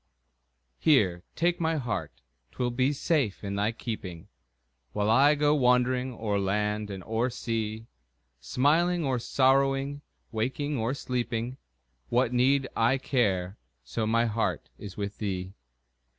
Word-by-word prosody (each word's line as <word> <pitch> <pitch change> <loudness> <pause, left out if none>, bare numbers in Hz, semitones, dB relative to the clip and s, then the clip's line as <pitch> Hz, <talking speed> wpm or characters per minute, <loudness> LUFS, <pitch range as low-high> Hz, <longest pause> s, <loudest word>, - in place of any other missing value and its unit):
Here, 105 - +3
take 175 +1 +1
my 160 -1 +1
heart 80 - -4 0.3
'twill 125 -1 -1
be 130 +3 +2
safe 140 - 0
in 100 -1 -3
thy 100 +2 +1
keeping, 100 -6 -6 0.6
While 105 +1 +1
I 140 +6 +6
go 145 0 +3
wandering 125 -1 +2
o'er 105 -2 -1
land 105 +2 -1
and 95 -2 -6
o'er 115 +5 0
sea; 110 -2 -3 0.5
Smiling 160 - +2
or 130 -2 0
sorrowing, 135 +2 +2 0.3
waking 130 +6 -2
or 115 +5 -1
sleeping, 125 -1 -3 0.5
What 125 0 +2
need 130 +2 +3
I 120 +4 +3
care, 100 -8 0 0.2
so 110 - -2
my 115 +1 +3
heart 115 0 -2
is 100 -2 -9
with 100 -1 -4
thee? 95 -2 -3
120 Hz, 130 wpm, -28 LUFS, 105-135 Hz, 0.6 s, I